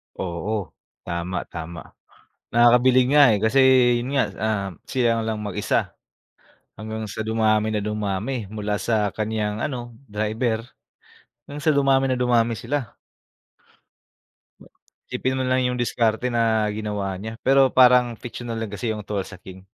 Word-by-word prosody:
Oo, 95 +2 -4 0.3
tama, 85 +1 -3
tama. 85 0 -7 0.7
Nakakabilib 125 +2 +5
nga, 150 0 +7
eh, - - 0
kasi 130 +5 +3 0.4
yun 130 +4 -4
nga, 135 - +4 0.2
ah, 110 -3 -1 0.2
sila 120 -3 +1
lang 110 -1 -3
mag-isa 100 -3 -1 0.8
hanggang 110 0 -6
sa 110 +1 -5
dumami 110 -1 +1
na 110 - -1
dumami. 105 +2 -3
Mula 105 -1 -3
sa 105 -3 0
kanyang 110 0 -2
ano, 120 -4 -4 0.2
driver 110 +2 -1 0.8
hanggang 145 +1 -8
sa 155 - +4
dumami 135 -1 +3
na 130 - +1
dumami 120 -2 +2
sila. 130 +3 -4 2.2
Isipin 130 +1 -1
mo 130 - -1
na 130 - +1
lang 130 -1 +2
yung 125 - -2
diskarte 120 0 0
na 110 -2 +2
ginawa 105 -2 -3
niya. 110 +1 -7
Pero 135 0 +5
parang 125 -2 +5
fictional 120 -1 -6
lang 110 -2 -5
kasi 115 +3 -3
yung 105 -2 -4
Tulsa 100 -2 -4
King. 95 0 -12
110 Hz, 140 wpm, -23 LUFS, 105-125 Hz, 2.2 s, nga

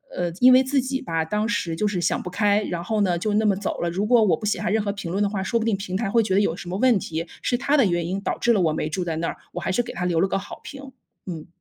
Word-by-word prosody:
呃， 175 -1 -1
因 255 +1 +8
为 255 - +7
自 270 +1 +1
己 265 +1 -3
吧， 165 -1 -1
当 210 +6 -1
时 170 -8 -1
就 210 +5 0
是 185 -4 -1
想 - - 0
不 180 - -6
开， 205 +2 +2
然 170 0 -4
后 215 +3 -1
呢， 180 -3 +2
就 205 +4 -1
那 220 - +2
么 205 -2 +3
走 200 +1 -4
了， 170 - 0
如 190 +5 -1
果 230 0 +5
我 200 - +3
不 215 - -6
写 210 - 0
下 - - -1
任 215 0 +1
何 200 - -1
评 195 -4 -6
论 200 +2 +1
的 200 - +1
话， 200 -2 -3
说 190 +5 0
不 220 - -2
定 225 -3 +2
平 190 -2 -5
台 205 -3 -2
会 230 - +4
觉 190 -3 0
得 200 - +4
有 170 -5 0
什 175 - -8
么 185 - -2
问 240 -2 +4
题， 165 0 -4 0.2
是 245 - 0
他 280 +4 +1
的 265 - +5
原 175 -2 0
因 190 +3 -3
导 - - -2
致 240 - +2
了 200 - +2
我 160 -2 +2
没 155 - -2
住 180 +4 -2
在 165 -2 -2
那 165 +1 -2
儿， - - -6 0.2
我 - - -4
还 190 - -1
是 245 - +2
给 245 - -7
他 180 - -3
留 170 -2 +1
了 195 - +3
个 195 - -1
好 195 - -8
评， 275 -1 -9 0.3
嗯。 165 -4 -7
200 Hz, 365 characters per minute, -23 LUFS, 175-220 Hz, 0.3 s, 因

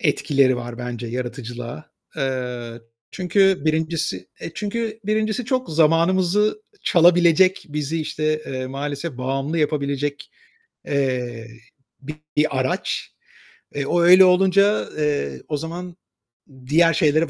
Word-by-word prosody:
etkileri 140 - +2
var 120 0 -7
bence 120 -1 -5
yaratıcılığa. 120 +2 -6 0.3
Eee, 125 -4 -4 0.3
çünkü 190 -3 +2
1.'si 155 - -1
e, - - -6
çünkü 220 +1 -3
1.'si 215 +3 0
çok 255 -3 -1
zamanımızı 180 - +2 0.2
çalabilecek, 175 +2 +4
bizi, 150 +2 -3
işte, 155 0 -2
eee, 130 -1 -4
maalesef 140 +2 -5
bağımlı 135 +5 -2
yapabilecek, 145 -1 -2 0.6
eee, 125 -4 -2 0.9
bir 150 -3 +2
araç. 130 - -2 0.6
E, 140 -1 -2
o 175 +4 +1
öyle 185 +2 +8
olunca, 195 +3 +3
eee, 145 - -1
o 150 - -1
zaman 170 +3 -7 0.7
diğer 165 +4 +4
şeylere 155 +2 +2
155 Hz, 110 wpm, -22 LUFS, 130-180 Hz, 0.9 s, öyle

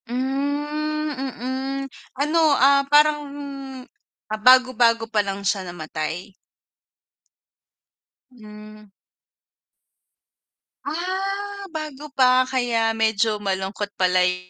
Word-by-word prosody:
Hmm, 290 +4 -2
mm. 265 +1 -4 0.3
Ano, 300 +4 +1 0.2
ah, 275 +2 +5
parang 295 +1 +5 1.1
ah, 215 - -2
bago-bago 245 -2 +5
pa 210 - +3
lang 200 0 -5
siya 195 0 +1
namatay? 170 +2 -5 2.0
Hmm. 215 -3 -14 1.9
Ah 390 +5 -3
bago 305 -3 -7
pa 255 -1 +6 0.2
kaya 240 -3 +1
medyo 220 -1 +1
malungkot 200 +1 -3
pala 180 0 +4
yung 180 0 -2
250 Hz, 85 wpm, -22 LUFS, 210-290 Hz, 2.0 s, pa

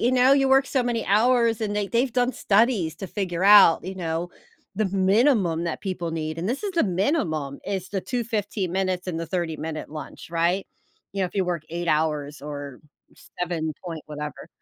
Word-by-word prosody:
you 245 +2 +2
know, 255 +1 +5
you 270 -1 +4
work 270 0 +5
so 260 -3 +1
many 240 -2 -1
hours, 230 +2 +3
and 210 -1 -2
they 205 -1 0
they've 240 +1 +1
done 250 0 +1
studies 205 -6 +2
to 195 - -6
figure 185 -2 -2
out, 200 -6 +7
you 190 +1 -5
know, 170 -1 -3 0.4
the 215 +3 0
minimum 190 - +2
that 170 - -3
people 185 -4 -3
need, 155 0 -4
and 180 - -2
this 260 - -2
is 400 - -2
the 340 - +2
minimum, 175 - -1
is 190 -2 -3
the 195 - -1
2, 245 +4 -3
15 205 -4 -2
minutes 185 -1 -1
and 175 -3 -3
the 165 - -4
thirty-minute 160 -4 -4
lunch, 155 0 -8
right? 170 +3 +1 0.5
You 195 0 -1
know, - - +2
if 180 - -13
you 195 - +1
work 175 -3 -2
8 170 +1 -3
hours 150 -2 0
or, 145 -3 -7 0.6
7 165 -3 -2
point 165 -3 -6
whatever. 150 -1 -7
185 Hz, 195 wpm, -24 LUFS, 165-225 Hz, 0.6 s, out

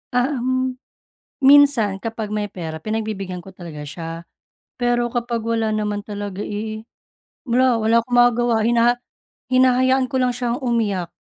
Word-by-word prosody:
Ah, 255 +2 +1
um, 255 +1 0 0.7
minsan 270 -8 +5
kapag 225 -1 -4
may 210 -1 -2
pera 160 -4 -6
pinagbibigyan 215 -4 -3
ko 190 +2 -12
talaga 160 -5 -8
siya. 165 +3 -7 0.7
Pero 240 0 +2
kapag 235 -2 -2
wala 225 -1 0
naman 210 -1 -1
talaga, 205 -1 -6
eh, 215 +1 -4 0.7
wala, 245 -1 +3
wala 220 +1 +2
akong 245 - -7
magagawa 240 -1 +4
hinaha 235 +1 +3 0.6
hinahayaan 255 +1 +3
ko 270 - -5
lang 250 -1 +1
siyang 245 -1 -2
umiyak 205 -8 -1
230 Hz, 140 wpm, -21 LUFS, 205-245 Hz, 0.7 s, minsan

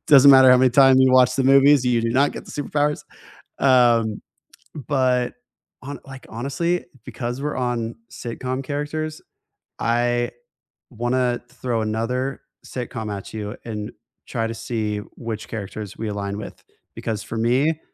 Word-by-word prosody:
doesn't 140 -1 +8
matter 130 -1 +8
how 125 - +8
many 130 0 +4
times 135 +1 +6
you 130 0 +5
watch 125 0 +5
the 135 - +1
movies, 135 0 +6
you 120 -2 +2
do 115 - 0
not 135 +4 +3
get - - -8
the - - -10
superpowers. 150 0 -1 0.6
Um, 120 -5 +4 0.7
but 130 -3 +1 0.5
hon 140 +1 -7
like, 135 -1 -11
honestly, 140 +9 -2 0.2
because 120 +2 -5
we're 150 +1 -2
on 120 -2 -2 0.2
sitcom 130 +3 -4
characters, 155 +2 -4 0.6
I 120 +1 +1 0.6
wanna 120 +1 0
throw 125 -2 -2
another 120 +5 -2 0.2
sitcom 110 -4 -5
at 100 - -9
you 105 -1 -5
and 105 -2 -5 0.3
try 115 0 -2
to 115 - -4
see 110 -2 -3 0.2
which 115 -3 -5
characters 105 -1 -6
we 110 - -4
align 100 -1 -4
with, 105 - -9 0.3
because 110 -2 -4
for 115 - -7
me, 130 +8 +2
125 Hz, 145 wpm, -22 LUFS, 115-135 Hz, 0.7 s, doesn't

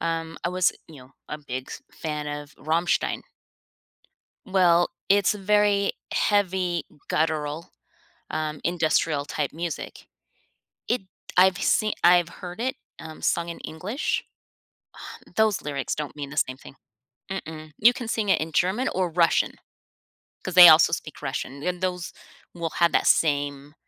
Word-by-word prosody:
um, 165 0 -3
I - - +2
was, 180 0 +2 0.2
you 160 - -13
know, 130 -1 -15 0.2
a 150 - -5
big 130 -3 -6
f - - -7 0.2
fan 150 -2 -4
of 145 -1 -6
Rammstein. 165 +4 0 1.2
Well, 175 -2 +3 0.2
it's 200 +1 +4
very 205 0 +2 0.2
heavy, 185 -4 +1 0.2
guttural, 155 0 -1 0.6
um, 155 -1 -3
industrial 160 -3 +1
type 145 -1 -3
music. 170 0 -6 0.8
It 245 -2 0 0.3
I've 185 0 +5
seen 215 -1 +2
I've 175 -1 +6
heard 180 +3 -9
it, 260 +3 -1 0.2
um, 160 -1 -10
sung 170 0 0
in 170 - -6
English. 195 - -3 0.8
Um, - - -13
those 220 -2 +2
lyrics 140 -3 -3
don't 150 -2 -5
mean 145 -2 -6
the 150 - -9
same 130 -3 0
thing. 135 - -14 0.6
Mm-mm, 155 -5 -7
you 235 +3 +6
can 245 -1 -6
sing 220 -2 -1
it 190 - +3
in 160 +1 -4
German 195 +11 +1
or 185 -1 0
Russian, 170 0 +2 0.9
'cause 185 - -5
they 180 -2 +11
also 160 +1 +7
speak 155 -2 -5
Russian, 140 0 -4
and 180 +1 -2
those 180 -1 -3 0.4
will 170 -2 -3
have 170 -1 +2
that - - +2
same 145 -1 +1
170 Hz, 145 wpm, -25 LUFS, 150-185 Hz, 1.2 s, they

